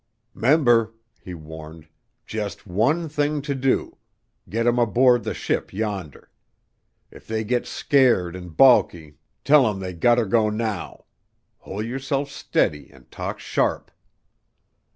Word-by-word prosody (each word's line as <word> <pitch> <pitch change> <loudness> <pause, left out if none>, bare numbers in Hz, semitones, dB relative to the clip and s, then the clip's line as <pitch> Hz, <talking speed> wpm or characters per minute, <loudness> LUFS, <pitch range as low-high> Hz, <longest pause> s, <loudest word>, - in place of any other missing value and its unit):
"'Member," 120 -3 +3 0.2
he 90 - -9
warned, 80 0 -11 0.4
"jus' 105 -2 -5
one 120 - 0
thing 150 0 -1
to 145 -1 -2
do, 135 -1 -1 0.5
git 115 +2 -1
'em 120 0 +2
aboard 120 +2 +3
the - - -4
ship - - -2
yonder. 100 -7 -5 0.8
If - - -16
they 110 0 -2
git 120 +3 -1
scared 120 - +2
and 90 -3 -10
balky, 85 - +4 0.3
tell 140 -3 +5
'em 100 -2 -4
they 95 -1 -5
gut 120 +8 +3
ter 120 - +2
go 110 +1 +2
now. 105 -2 -4 0.5
Hol' 100 +3 -6
yerself 135 +4 -3
steady 75 - -1
and - - -21
talk - - -5
sharp." - - -1
110 Hz, 130 wpm, -23 LUFS, 95-130 Hz, 0.8 s, tell